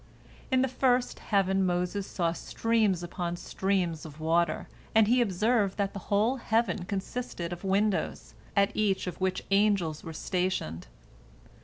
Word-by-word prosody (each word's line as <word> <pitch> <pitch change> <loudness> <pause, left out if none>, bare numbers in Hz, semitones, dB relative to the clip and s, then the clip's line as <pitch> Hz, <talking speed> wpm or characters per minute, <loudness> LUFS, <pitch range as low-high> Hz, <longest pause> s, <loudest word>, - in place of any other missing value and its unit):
In 260 -1 +3
the - - +2
first 250 -1 +1
heaven 195 -2 +1
Moses 180 +2 -1
saw 170 -3 0
streams 215 -2 0
upon 175 0 -3
streams 180 -3 -1
of 155 -1 -10
water, 165 +1 +1 0.3
and 220 -1 +6
he 245 +2 +4
observed 210 0 +1
that 200 -1 -1
the 200 - -5
whole 215 +6 +2
heaven 225 -5 0
consisted 190 -3 -4
of 175 - -9
windows, 200 +2 0 0.2
at 200 0 +3
each 200 -3 +1
of 180 0 -6
which 185 -1 0
angels 195 -6 +2
were 165 - -6
stationed. 180 - -2
195 Hz, 145 wpm, -29 LUFS, 175-215 Hz, 0.3 s, and